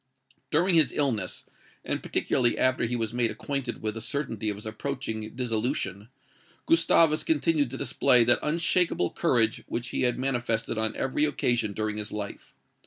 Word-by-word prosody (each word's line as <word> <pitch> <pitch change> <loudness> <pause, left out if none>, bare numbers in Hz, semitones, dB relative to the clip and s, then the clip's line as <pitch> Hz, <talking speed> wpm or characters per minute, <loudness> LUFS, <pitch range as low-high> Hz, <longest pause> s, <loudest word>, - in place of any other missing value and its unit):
"During 175 +5 +2
his 155 -7 +4
illness, 115 -10 -2 0.4
and - - -2
particularly 120 -2 +1
after 130 -2 +2
he 120 +1 -1
was 115 -2 -2
made 120 -1 +1
acquainted 135 -4 -4
with 110 -1 -1
the 115 - -7
certainty 115 -4 -3
of 105 - -2
his 105 - -11
approaching 110 -1 -4
dissolution, 115 -4 -2 0.6
Gustavus 165 -1 +4
continued 155 -3 +1
to 135 - -6
display 125 -3 +4
that 120 +1 +4
unshaken 170 +3 +1
courage 115 -3 +1
which 120 +2 -4
he - - -2
had 125 -1 +1
manifested 120 -4 -1
on 110 0 -1
every 135 +3 +1
occasion 120 -7 0
during 110 0 -2
his 105 0 -4
life. 105 -1 -7
120 Hz, 160 wpm, -27 LUFS, 110-140 Hz, 0.6 s, his